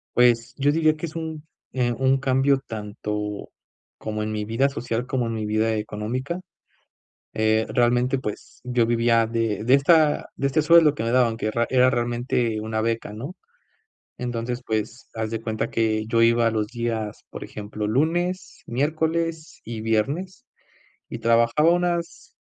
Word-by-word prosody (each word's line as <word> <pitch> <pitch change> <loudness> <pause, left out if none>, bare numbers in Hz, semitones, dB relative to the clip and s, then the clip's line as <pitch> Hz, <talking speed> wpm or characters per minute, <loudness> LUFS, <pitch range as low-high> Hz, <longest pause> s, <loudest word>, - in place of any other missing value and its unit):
Pues, 120 +1 +3
yo 145 +1 +2
diría 155 -1 +3
que 170 - -4
es 155 - -10
un, 160 -1 -5 0.3
eh, 125 -2 +1
un 135 +2 +2
cambio 135 +1 +2
tanto 105 -1 -5 0.5
como 110 0 -4
en 110 0 -3
mi 105 -1 -2
vida 115 +6 +1
social, 125 -3 -3
como 130 -3 -1
en 115 - -3
mi 110 -1 -3
vida 110 +1 +1
económica. 120 - -3 0.9
Eh, 110 0 +2
realmente, 125 +2 +2
pues, 105 -5 -7
yo 125 -2 +1
vivía 115 0 +3
de 115 -3 -1
de 125 +3 +3
esta 150 +1 +3
de 140 - 0
este 155 +3 +2
sueldo 160 -1 +6
que 115 - -3
me 115 - -1
daban 120 -3 +3
que 110 -1 -2
ra 120 +1 +1
era 130 0 +5
realmente 120 -2 -1
una 110 0 -2
beca, 115 -2 -2
¿no? 135 - -7 0.8
Entonces, 120 0 -3
pues, 110 +2 -3
haz 110 -1 -3
de 115 -1 -3
cuenta 110 0 -3
que 110 -1 0
yo 115 0 +1
iba 115 0 +4
a - - +3
los 110 -1 -1
días, 115 -3 -4
por - - -8
ejemplo, 105 0 -5
lunes, 175 - -1
miércoles 160 +4 -1
y 115 -1 -6
viernes, 140 - -1 0.6
y - - -6
trabajaba 115 +7 +3
unas, 175 -1 -2
120 Hz, 165 wpm, -24 LUFS, 110-140 Hz, 0.9 s, sueldo